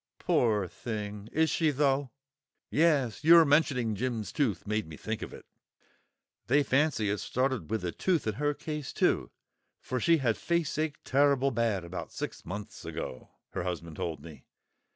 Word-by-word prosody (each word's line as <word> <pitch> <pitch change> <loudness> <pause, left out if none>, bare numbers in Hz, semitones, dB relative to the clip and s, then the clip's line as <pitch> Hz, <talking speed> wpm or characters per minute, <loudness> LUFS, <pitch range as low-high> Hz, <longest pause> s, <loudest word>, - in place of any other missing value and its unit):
"Pore 105 -5 +2
thing! 105 +1 -6
Is 160 +1 +2
she 160 -2 +2
though?" 140 -1 +1 0.6
"Yes, 150 -7 +2
your 165 +1 +8
mentioning 140 -6 +2
Jim's 115 -1 -2
tooth 110 - 0
made 105 -1 -1
me 80 -1 -9
think 110 0 -4
of - - -6
it. - - -11 1.0
They 145 +4 +4
fancy 130 -7 +2
it 105 - -1
started 130 - -1
with 110 -5 -1
a 85 - -1
tooth 175 - 0
in 110 - 0
her 145 +6 0
case 150 -3 -5
too; - - +1 0.5
for 125 - -3
she 165 +6 +4
had 120 -6 +1
faceache 160 -3 -1
turrible 140 0 +3
bad 115 -6 0
about 85 0 -6
six - - -5
months 100 +3 -7
ago, 65 - -6 0.2
her - - -2
husband 85 -3 -4
told 80 -4 -3
me. 80 -2 -12
125 Hz, 160 wpm, -30 LUFS, 105-145 Hz, 1.0 s, your